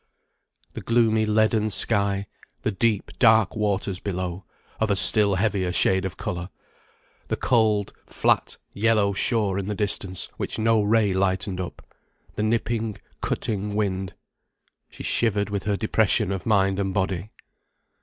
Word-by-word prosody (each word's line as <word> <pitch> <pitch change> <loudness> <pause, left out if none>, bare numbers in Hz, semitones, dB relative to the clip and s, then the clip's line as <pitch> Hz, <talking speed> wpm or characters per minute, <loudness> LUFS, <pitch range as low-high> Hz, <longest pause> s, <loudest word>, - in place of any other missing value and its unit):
The - - -6
gloomy 110 -2 +2
leaden 110 0 +2
sky, 100 0 +1 0.4
the 110 - 0
deep, 105 -3 0
dark 110 -3 +5
waters 100 -3 -1
below, 90 -1 -4 0.3
of 110 - +1
a 100 - +3
still 100 0 +4
heavier 95 -2 0
shade 95 +1 +2
of 95 - -5
colour, 90 +1 -4 0.8
the - - -1
cold, 110 -4 +1
flat - - 0 0.2
yellow 105 -1 +2
shore 100 -2 0
in 100 - -4
the 105 - -2
distance, 100 -2 -2
which - - -4
no 110 0 +3
ray 105 -1 +2
lightened 95 0 0
up, 90 - -8 0.5
the - - -3
nipping, 110 -1 -1 0.2
cutting 105 -1 -2
wind. 95 -3 -2 0.7
She - - -10
shivered 105 -3 0
with 100 -2 -3
her 105 -1 0
depression 110 -1 +1
of 95 0 -4
mind 95 -2 +2
and 95 -1 -2
body. 95 0 -1
100 Hz, 140 wpm, -24 LUFS, 95-110 Hz, 0.8 s, dark